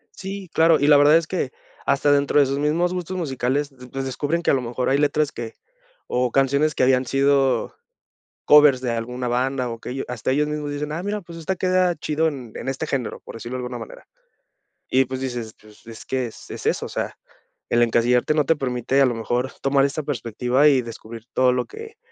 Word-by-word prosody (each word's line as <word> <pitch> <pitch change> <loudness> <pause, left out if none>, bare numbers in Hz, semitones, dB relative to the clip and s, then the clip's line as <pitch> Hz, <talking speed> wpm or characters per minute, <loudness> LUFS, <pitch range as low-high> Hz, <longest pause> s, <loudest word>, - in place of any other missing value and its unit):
Sí, 195 -2 -7
claro. 165 0 +4
Y 145 - +2
la 145 -1 +7
verdad 145 +2 +6
es 165 - -1
que, 170 -8 -2 0.3
hasta 140 +1 +2
dentro 145 +1 +3
de 140 - +6
sus 135 +1 -2
mismos 165 +5 +1
gustos 185 +1 -4
musicales, 140 -2 -1 0.2
pues 135 0 -3
descubren 145 +6 -1
que, - - +3
a - - +3
lo 130 - +1
mejor, 125 +1 -2
hay 135 - +3
letras 150 0 +1
que 115 -1 -7 0.5
o 125 -1 0
canciones 140 +3 +2
que - - +1
habían 130 0 +3
sido, 135 -2 +2 0.7
covers 150 -3 +6
de 125 - -1
alguna 125 +2 -4
banda, 125 0 -1
o 115 - -7
que - - -7
ello 135 +2 -4
hasta 125 0 -3
ellos 150 +3 +2
mismos 150 -1 -3
dicen: 150 +1 -4
"Ah 165 +3 -3
mira, 205 +1 -3
pues 170 -1 -11
esta 180 +3 -2
queda 185 -1 +2
chido 155 +2 0
en 130 -7 -7
en - - -6
este 135 +4 -2
género", 130 -6 -3
por - - -10
decirlo 120 +3 -6
de - - -4
alguna 125 - -5
manera. - - -11 0.8
Y 130 +1 +3
pues, 130 +1 -5
dices: 120 -4 -4
"Pues, 105 0 -19
es 115 -1 -11
que 130 -2 -1
es 115 - -13
es - - -8
eso", - - 0
o - - -7
sea, - - -4 0.5
el 120 - +3
encasillarte 120 +4 +2
no 150 -2 +2
te 165 - +3
permite 130 -1 0
a - - +6
lo 120 - 0
mejor 120 +3 -2
tomar 135 0 +3
esta 140 +2 -2
perspectiva, 125 +1 +1
y 135 -3 +3
descubrir 115 -1 -10
todo 130 -1 +4
lo 125 -1 -1
que 445 0 -11
135 Hz, 220 wpm, -22 LUFS, 125-150 Hz, 0.8 s, la